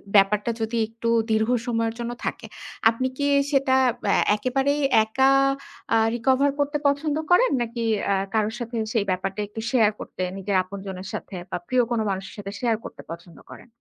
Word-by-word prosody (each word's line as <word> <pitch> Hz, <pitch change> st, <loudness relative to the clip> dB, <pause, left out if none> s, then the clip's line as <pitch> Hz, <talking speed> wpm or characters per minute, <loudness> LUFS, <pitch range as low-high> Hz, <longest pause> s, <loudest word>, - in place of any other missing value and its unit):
ব্যাপারটা 205 Hz, +3 st, +4 dB
যদি 225 Hz, +1 st, -1 dB
একটু 230 Hz, +1 st, -4 dB, 0.2 s
দীর্ঘ 220 Hz, +1 st, +2 dB, 0.2 s
সময়ের 230 Hz, -2 st, 0 dB
জন্য 235 Hz, 0 st, -3 dB
থাকে। -, -, -4 dB, 0.4 s
আপনি 230 Hz, +3 st, -1 dB
কি 285 Hz, -, 0 dB, 0.3 s
সেটা 275 Hz, -2 st, +3 dB, 0.4 s
এ -, -, +4 dB, 0.2 s
একেবারেই 270 Hz, +6 st, 0 dB, 0.2 s
একা 265 Hz, +5 st, +3 dB, 0.7 s
আ -, -, +5 dB, 0.2 s
রিকভার 260 Hz, +4 st, +2 dB
করতে 290 Hz, +1 st, +1 dB
পছন্দ 285 Hz, +1 st, 0 dB, 0.2 s
করেন? 425 Hz, +8 st, +5 dB
নাকি 235 Hz, 0 st, -3 dB, 0.3 s
এ -, -, +2 dB, 0.2 s
কারোর 220 Hz, 0 st, +1 dB
সাথে 240 Hz, 0 st, -5 dB, 0.2 s
সেই 220 Hz, -4 st, +1 dB
ব্যাপারটা 190 Hz, +2 st, -3 dB
একটু 215 Hz, +2 st, -7 dB
শেয়ার 225 Hz, -5 st, +4 dB
করতে -, -, -8 dB, 0.2 s
নিজের 195 Hz, +1 st, -2 dB
আপনজনের 190 Hz, 0 st, -7 dB
সাথে 195 Hz, -, -6 dB
বা -, -, -2 dB
প্রিয় 255 Hz, -1 st, +3 dB
কোন 235 Hz, -, +1 dB
মানুষের 190 Hz, 0 st, -4 dB
সাথে 200 Hz, -1 st, -6 dB
শেয়ার 235 Hz, -2 st, +1 dB
করতে -, -, -9 dB
পছন্দ 170 Hz, 0 st, -10 dB
করেন? -, -, -12 dB
230 Hz, 170 wpm, -24 LUFS, 200-260 Hz, 0.7 s, আ